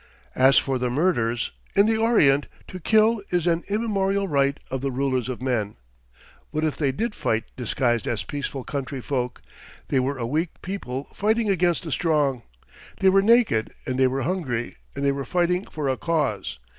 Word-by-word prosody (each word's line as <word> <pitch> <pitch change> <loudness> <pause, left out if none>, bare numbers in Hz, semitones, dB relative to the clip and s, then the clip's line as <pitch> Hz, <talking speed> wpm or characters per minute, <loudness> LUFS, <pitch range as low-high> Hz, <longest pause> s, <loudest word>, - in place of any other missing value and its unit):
As 130 +2 +5
for 135 -2 +2
the 125 0 0
murders 120 -5 0 0.2
in 200 - +6
the 225 +1 +2
Orient 155 -12 +4 0.2
to 185 - -7
kill 220 +4 +3
is 175 -2 0
an 170 -1 +2
immemorial 200 -2 0
right 140 -3 +1
of 130 -1 -2
the 140 - -1
rulers 130 -1 -1
of 125 0 -5
men. 110 -6 -1 0.7
What 155 - -2
if 155 -2 0
they 140 -3 +1
did 225 - -2
fight 110 - 0
disguised 120 -1 0
as 110 -3 -1
peaceful 140 +1 -4
country 135 -1 -4
folk? 125 -1 -3 0.5
They 135 - +2
were 135 +2 -1
a 120 - -3
weak 155 +7 -2
people 140 -9 -4
fighting 220 +1 +1
against 175 -2 +1
a 160 - -5
strong. 145 -6 +1 0.6
They 190 - +5
were 195 +1 +5
naked 220 - +3
and 130 0 -2
they 130 - +5
were 135 +1 -1
hungry, 130 -10 -2 0.2
and 140 0 -2
they 140 - +4
were 140 0 -3
fighting 180 - 0
for 150 -3 -4
a 130 -1 0
cause. 165 -2 -1
140 Hz, 180 wpm, -24 LUFS, 130-185 Hz, 0.7 s, in